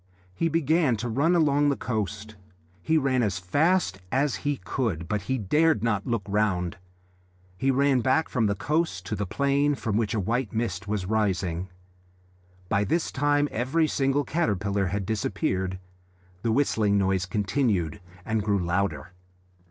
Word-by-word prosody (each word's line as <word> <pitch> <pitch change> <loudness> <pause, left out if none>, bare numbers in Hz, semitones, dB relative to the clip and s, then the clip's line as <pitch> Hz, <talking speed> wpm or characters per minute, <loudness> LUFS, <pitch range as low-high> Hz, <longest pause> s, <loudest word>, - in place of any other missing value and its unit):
He 165 - 0
began 160 -4 +2
to 120 +4 -3
run 140 +10 +2
along 145 -3 +3
the 140 - +1
coast. 105 -2 -4 0.5
He 160 - +2
ran 135 -4 +2
as 100 -5 0
fast 120 - +1
as 135 +1 +1
he 145 -1 -2
could, 95 - -3
but 105 +3 -1
he 130 - +1
dared 150 - +2
not 105 -4 0
look 115 -4 -1
round. 100 -4 0 0.8
He 135 +9 0
ran 135 0 +3
back 135 +6 +2
from 115 -4 +1
the 100 - 0
coast 150 - -1
to 105 - -3
the 100 -1 -3
plain, 140 +5 +1
from 110 -5 -2
which 110 -1 0
a - - +1
white 115 +4 -1
mist 110 -3 -2
was 100 -3 -2
rising. 95 -4 -1 1.0
By 100 +2 +1
this 165 +9 0
time 145 +1 +2
every 130 +8 +1
single 140 0 +1
caterpillar 100 - 0
had 100 +2 -2
disappeared. 95 -3 -1 0.6
The 115 - 0
whistling 110 -5 +2
noise 95 -2 +1
continued 100 - 0 0.2
and 110 -1 0
grew 100 -1 +1
louder. 90 -1 -1
110 Hz, 155 wpm, -26 LUFS, 100-140 Hz, 1.0 s, along